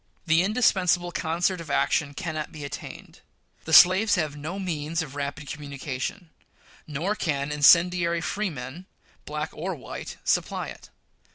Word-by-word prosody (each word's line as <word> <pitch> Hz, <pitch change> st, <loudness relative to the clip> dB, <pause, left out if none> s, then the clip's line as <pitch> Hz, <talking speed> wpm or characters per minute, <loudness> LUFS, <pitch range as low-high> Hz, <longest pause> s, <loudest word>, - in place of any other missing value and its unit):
The 165 Hz, 0 st, +4 dB
indispensable 185 Hz, -5 st, +2 dB
concert 175 Hz, +2 st, -1 dB
of 160 Hz, -, -10 dB
action 145 Hz, 0 st, +1 dB
cannot 155 Hz, -2 st, -4 dB
be 155 Hz, -2 st, -8 dB
attained. 140 Hz, -, -9 dB, 0.5 s
The -, -, -5 dB
slaves 185 Hz, +5 st, +7 dB
have 155 Hz, -5 st, -1 dB
no 155 Hz, +6 st, -5 dB
means 165 Hz, -3 st, -2 dB
of 145 Hz, -4 st, -10 dB
rapid 145 Hz, +1 st, -5 dB
communication; 145 Hz, +4 st, -5 dB, 0.6 s
nor 155 Hz, +7 st, -1 dB
can 150 Hz, -7 st, -2 dB
incendiary 170 Hz, +3 st, +5 dB
freemen, 175 Hz, -4 st, -4 dB, 0.4 s
black -, -, -4 dB
or -, -, -4 dB
white, -, -, -8 dB
supply -, -, 0 dB
it. -, -, -12 dB
165 Hz, 130 wpm, -26 LUFS, 145-180 Hz, 0.6 s, slaves